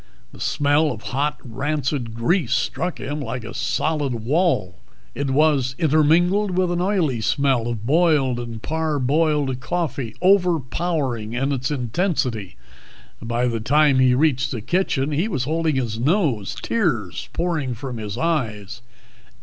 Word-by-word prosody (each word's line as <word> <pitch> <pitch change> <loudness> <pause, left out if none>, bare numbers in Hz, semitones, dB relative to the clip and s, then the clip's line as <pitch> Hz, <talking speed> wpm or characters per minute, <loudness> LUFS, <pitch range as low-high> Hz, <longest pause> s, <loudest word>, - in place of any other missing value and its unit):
The - - -14
smell 145 +2 +2
of 110 -3 -7
hot, 145 +3 0
rancid 135 -1 -2
grease 130 +5 +1
struck 180 0 -2
him 145 +1 -4
like 125 -2 -4
a 115 - -7
solid 150 -5 -1
wall. 115 - 0 0.3
It 140 -1 -2
was 135 -2 +2
intermingled 175 +6 +3
with 185 -1 +2
an 175 0 0
oily 175 - +1
smell 130 -1 +1
of 115 -3 -4
boiled 145 -4 +3
and 115 -2 -7
parboiled 150 -3 0
coffee, 135 -6 -3
overpowering 165 - +1
in 135 +3 0
its 130 -1 -1
intensity. 125 - -1 0.6
By 120 +2 -1
the 115 -2 -1
time 140 +3 +3
he 130 -1 +4
reached 135 -2 +2
the 120 -5 -4
kitchen 150 - 0
he 160 +8 0
was 155 - -2
holding 160 +1 0
his 115 -4 -2
nose, 130 - +1
tears 120 - -1
pouring 160 -7 -1
from 125 +1 -6
his 105 -1 -5
eyes. 120 - -2
140 Hz, 140 wpm, -22 LUFS, 120-160 Hz, 0.6 s, he